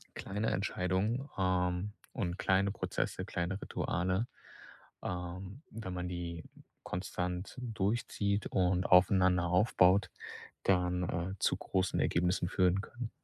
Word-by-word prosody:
kleine 105 +3 -2
Entscheidungen, 100 +7 0
ähm, 90 +1 +1 0.2
und 90 -1 -2
kleine 95 +1 +2
Prozesse, - - -2
kleine 90 +3 -2
Rituale, 95 +7 -1 0.7
ähm, 90 - -5
wenn 105 -4 -6
man 90 0 -3
die 85 -2 -4 0.4
konstant 90 +1 -3
durchzieht 105 -2 0
und 90 -1 +2
aufeinander 90 -1 +5
aufbaut, 90 +1 +4 0.5
dann, 90 -1 +2
äh, 85 +3 -2
zu - - +2
großen 95 -1 0
Ergebnissen 90 +1 +1
führen 95 +1 +3
können. 120 +1 -6
95 Hz, 110 wpm, -33 LUFS, 90-100 Hz, 0.7 s, aufeinander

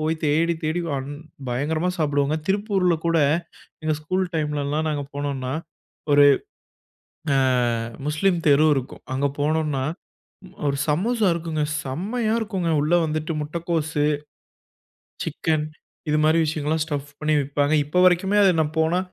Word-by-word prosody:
போய் 160 +1 0
தேடி, 160 +3 +2
தேடி, 160 +3 0
வன் 135 0 -3 0.4
பயங்கரமா 155 +8 0
சாப்பிடுவோங்க. 145 -1 +1
திருப்பூர்ல 195 -3 +2
கூட 165 0 +3 0.7
எங்க 155 - +1
ஸ்கூல் 185 +4 -1
டைம்லலாம் 150 0 -1
நாங்க 145 -2 -2
போனோன்னா, 140 -2 -3 0.6
ஒரு 145 0 +7 1.1
ஆ, - - +3 0.7
முஸ்லீம் 170 +4 +1
தெரு 145 +2 +5
இருக்கும். 135 -1 -5
அங்க 135 +2 +1
போனோம்ன்னா, 150 -2 0 0.9
ஒரு 140 - 0
சமோசா 210 +8 +1
இருக்குங்க. 160 -2 -2 0.2
செம்மையா 215 - -2
இருக்கும்ங்க. 190 -6 -2
உள்ள 155 +4 +2
வந்துவிட்டு 155 +1 -2
முட்டைக்கோஸு, 160 -1 -1 1.2
சிக்கன் 155 -2 -1 0.4
இது 150 - +2
மாரி 155 +1 +4
விஷயங்கள்லாம், 155 +1 -1
ஸ்டஃப் 145 -2 -4
பண்ணி 155 0 +1
விப்பாங்க. 145 +2 0
இப்ப 165 +5 0
வரைக்குமே 185 +3 +3
அத 195 - +6
நான் 155 0 -2
போனா 160 +3 +2
155 Hz, 125 wpm, -23 LUFS, 145-170 Hz, 1.2 s, ஒரு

